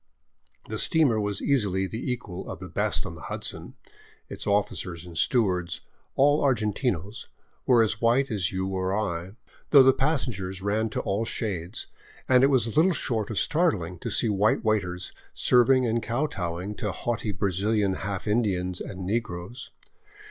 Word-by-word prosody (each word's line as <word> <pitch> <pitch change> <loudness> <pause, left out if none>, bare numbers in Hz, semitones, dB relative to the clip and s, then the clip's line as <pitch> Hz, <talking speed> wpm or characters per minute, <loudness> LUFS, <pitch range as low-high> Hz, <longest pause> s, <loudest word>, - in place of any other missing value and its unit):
The - - -4
steamer 145 -10 +3
was 105 -1 -2
easily 100 -9 +1
the 115 +7 -4
equal 100 -7 -6
of - - -5
the - - -8
best - - -1
on - - -6
the - - -11
Hudson; - - -5 0.5
its - - -6
officers 90 -4 -1
and 85 -1 -11
stewards, 90 -4 +1 0.3
all 145 +2 +4
argentinos, 105 - -1 0.4
were 120 -3 +6
as 110 0 -1
white 125 +3 +2
as 95 -3 0
you 95 0 -2
or 95 +1 -1
I, 95 -3 -3 0.4
though 140 -3 +8
the 130 0 +6
passengers 120 - -1
ran 105 +3 0
to - - -2
all 100 +3 -1
shades, 100 -4 -3 0.4
and 130 0 +5
it - - +7
was 120 -5 +2
little 175 +4 +4
short 115 -9 -1
of 110 - -4
startling 100 - +1
to - - -4
see - - +2
white 105 +2 +2
waiters 90 -5 -1 0.2
serving 125 +1 +4
and 115 0 0
kowtowing 105 - -2
to 105 - -2
haughty 115 +1 -2
Brazilian 100 +2 0
half 95 +1 -4
In 105 +3 +3
dians 90 -4 -2
and 95 -1 -6
negroes. 100 +1 -4
105 Hz, 160 wpm, -26 LUFS, 95-120 Hz, 0.5 s, though